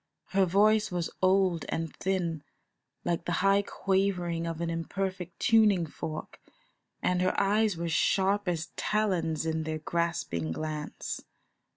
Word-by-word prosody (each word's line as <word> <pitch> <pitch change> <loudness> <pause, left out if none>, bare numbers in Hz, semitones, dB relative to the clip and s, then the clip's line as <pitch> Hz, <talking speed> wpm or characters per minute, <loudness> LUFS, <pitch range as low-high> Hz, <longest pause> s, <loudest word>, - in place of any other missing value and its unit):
Her 195 -1 +3
voice 210 +4 +4
was 175 -2 -2
old 185 -3 +3
and 165 -1 -3
thin, 175 -5 -1 0.6
like 170 -1 -1
the 175 - -1
high 195 +1 +5
quavering 185 -4 0
of 165 -1 -4
an 170 0 -1
imperfect 180 +1 -4
tuning 210 -6 +4
fork, 155 0 -6 0.6
and 180 0 +2
her 185 - +1
eyes 205 -1 +2
were 170 0 -2
sharp 195 +4 +2
as 170 -1 -2
talons 175 -7 0
in 160 0 0
their 155 0 -3
grasping 155 - -2
glance. 155 - -4
175 Hz, 135 wpm, -29 LUFS, 165-195 Hz, 0.6 s, high